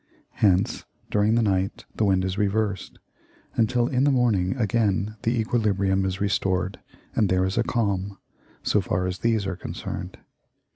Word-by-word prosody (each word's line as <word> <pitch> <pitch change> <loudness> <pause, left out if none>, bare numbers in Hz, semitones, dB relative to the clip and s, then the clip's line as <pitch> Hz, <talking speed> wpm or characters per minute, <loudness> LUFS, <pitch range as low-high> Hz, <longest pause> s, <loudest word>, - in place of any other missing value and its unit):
Hence 95 -3 +2 0.3
during 105 +2 +3
the 115 - +3
night 95 -1 0
the 110 - +1
wind 95 -1 +2
is 95 -1 -2
reversed, 105 -1 -1 0.6
until 120 +1 +2
in 130 0 +1
the 145 - +4
morning 115 -8 +2
again 110 -3 +1
the 115 +1 0
equilibrium 100 -4 +1
is 95 0 -2
restored 95 -1 0 0.4
and 105 -4 +2
there 95 0 +2
is 95 - -2
a 115 - +3
calm, 100 -5 -1 0.5
so - - +2
far 90 +1 -1
as 90 +1 -3
these 115 -3 +1
are 95 -1 -2
concerned. 85 - -6
100 Hz, 155 wpm, -25 LUFS, 95-115 Hz, 0.6 s, the